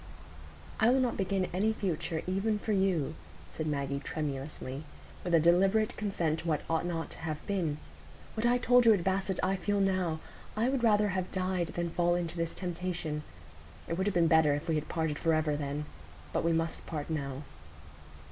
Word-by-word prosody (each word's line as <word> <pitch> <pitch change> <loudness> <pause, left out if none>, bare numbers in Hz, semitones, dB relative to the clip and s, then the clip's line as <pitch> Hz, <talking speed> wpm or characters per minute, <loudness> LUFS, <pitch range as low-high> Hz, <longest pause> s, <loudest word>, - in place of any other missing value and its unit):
"I 220 - +5
will 260 +2 +4
not 250 -2 +1
begin 195 -1 0
any 210 +5 +2
future, 165 -5 -2
even 195 +4 0
for 215 - -3
you," 190 -7 +1 0.4
said 155 - -3
Maggie, 140 -2 -1
tremulously, 140 -1 -4 0.4
"with 175 -1 +2
a - - +7
deliberate 190 +6 +4
consent 170 -7 -1
to 170 - -6
what 155 -2 +1
ought 165 +1 0
not 165 -2 -3
to - - -6
have 155 -2 -4
been. 175 -7 -1 0.6
What 220 - -2
I 240 +1 +4
told 245 -1 +5
you 220 - +8
at 180 - -2
Basset 190 0 0
I 190 +1 +2
feel 200 +2 0
now; 185 -5 +1 0.4
I 230 +4 +2
would 265 -2 0
rather 210 -2 +4
have 185 -1 -2
died 185 -2 0
than 170 -1 -1
fall 175 0 +2
into 170 -1 -2
this 165 -1 -2
temptation. 175 -4 -3 0.7
It 165 - -1
would 190 - +1
have 205 - 0
been 170 -1 +5
better 160 -3 +5
if 145 +4 -5
we 165 - +1
had 155 -1 -1
parted 160 -3 -1
forever 155 -2 +2
then. 145 0 -3 0.5
But - - +1
we 165 - +2
must 165 0 -1
part 150 -3 -4
now." 140 -2 -3
175 Hz, 190 wpm, -31 LUFS, 155-195 Hz, 0.7 s, you